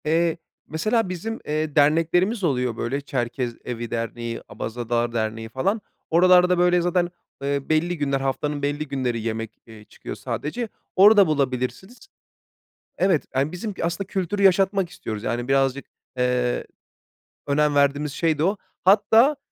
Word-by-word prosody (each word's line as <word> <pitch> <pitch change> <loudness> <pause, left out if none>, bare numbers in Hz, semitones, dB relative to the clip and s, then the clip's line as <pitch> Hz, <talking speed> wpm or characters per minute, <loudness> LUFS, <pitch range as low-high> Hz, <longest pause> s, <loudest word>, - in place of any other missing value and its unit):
Eee, 165 +1 +2 0.3
mesela 215 +7 0
bizim, 215 +6 -4
eee, 155 0 -2
derneklerimiz 165 +8 +3
oluyor, 125 -7 0
böyle, 135 +4 -2
Çerkez 125 -2 -3
Evi 120 -2 -5
Derneği, 115 0 -4
Abazalar 120 0 -2
Derneği 110 0 -2
falan. 195 - -1 0.3
Oralarda, 180 +1 +5
böyle, 180 0 +3
zaten, 175 0 +1 0.3
ııı, 140 0 -2
belli 170 +3 +1
günler, 140 -2 0
haftanın 145 +2 -2
belli 145 +2 -2
günleri 130 -4 -2
yemek, 115 0 -3 0.2
ııı, 110 -1 -12
çıkıyor - - -9
sadece, 225 +10 -4 0.3
orada 200 0 +7
bulabilirsiniz. 145 - -2 0.9
Evet, 185 -5 +2
yani, 135 +4 0
bizim 200 +3 -5
aslında 170 +4 -2
kültürü 200 +1 -2
yaşatmak 195 -1 +3
istiyoruz, 110 - -6
yani, 120 +2 -2
birazcık, 135 0 +1 0.3
eee, 125 -1 0 0.8
önem 150 +1 +2
verdiğimiz 145 +1 +2
şey 160 0 0
de 155 - +1
o. 195 +4 +1 0.3
Hatta 220 +8 +5
150 Hz, 135 wpm, -23 LUFS, 125-180 Hz, 0.9 s, orada